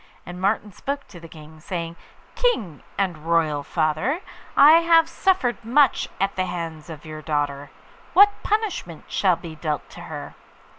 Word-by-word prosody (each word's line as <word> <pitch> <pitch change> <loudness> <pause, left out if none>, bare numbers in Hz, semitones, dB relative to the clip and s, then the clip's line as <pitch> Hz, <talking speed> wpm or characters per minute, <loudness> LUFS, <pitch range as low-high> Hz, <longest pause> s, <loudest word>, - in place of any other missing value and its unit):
And 180 +1 -8
Martin 205 +1 0
spoke 280 +7 -5
to 175 - -11
the 165 - -11
King, 155 -1 -13
saying, 170 0 -5 0.4
'King 215 - 0 0.2
and 185 -5 -1
royal 160 -2 +1
father, 155 - 0 0.4
I 310 +3 +9
have 330 -1 +5
suffered 335 - 0
much 260 +3 +3
at 195 +1 0
the 185 - 0
hands 165 -3 -6
of 155 -2 -9
your 155 0 -7
daughter. 145 -2 -2 0.4
What 405 +1 +6
punishment 410 - -2
shall 185 -3 +2
be 165 -1 -9
dealt 155 -2 -3
to - - -11
her? - - -7
175 Hz, 155 wpm, -23 LUFS, -, 0.4 s, I